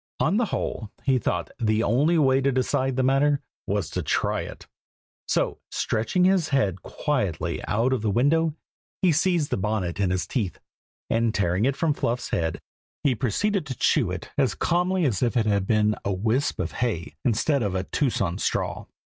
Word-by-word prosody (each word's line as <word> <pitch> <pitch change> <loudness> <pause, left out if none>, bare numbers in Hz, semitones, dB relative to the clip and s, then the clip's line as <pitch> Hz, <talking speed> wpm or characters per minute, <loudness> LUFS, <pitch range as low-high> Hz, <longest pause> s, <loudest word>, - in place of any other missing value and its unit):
On 180 +6 +2
the 240 - +2
whole, 110 - -3
he 130 -2 +2
thought 90 -5 -2
the 110 0 +1
only 145 +11 +3
way 135 -3 +4
to 140 +1 +2
decide 130 0 0
the 130 - +1
matter 140 +2 +3 0.3
was 100 0 0
to - - -2
try - - 0
it; - - -9 0.6
so - - 0
stretching 115 - 0
his 185 -4 +3
head 100 -10 +1
quietly 90 - -2
out 115 +5 +1
of 125 - -1
the 110 - 0
window, 150 +8 +2 0.5
he 180 - +5
seized 165 -1 +1
the - - +1
bonnet 100 -3 -2
in 100 -2 +2
his 90 -3 0
teeth, 100 -1 -2 0.5
and 115 -1 +1
tearing 90 +2 +1
it 135 0 +1
from 160 -1 +1
Fluff's 120 -3 -2
head, 80 0 -1 0.4
he 140 - +3
proceeded 150 - 0
to 130 - -5
chew - - +2
it - - -6
as - - +2
calmly 180 0 +1
as 120 -9 0
if 120 -2 +1
it 115 - +2
had 100 -2 +1
been 105 -1 +3
a 100 - -1
wisp 110 +9 0
of - - -2
hay 115 -10 -2
instead 130 +4 +1
of 100 -4 -1
a 95 - 0
Tuscan 100 - -1
straw. - - -2
120 Hz, 185 wpm, -25 LUFS, 100-145 Hz, 0.6 s, he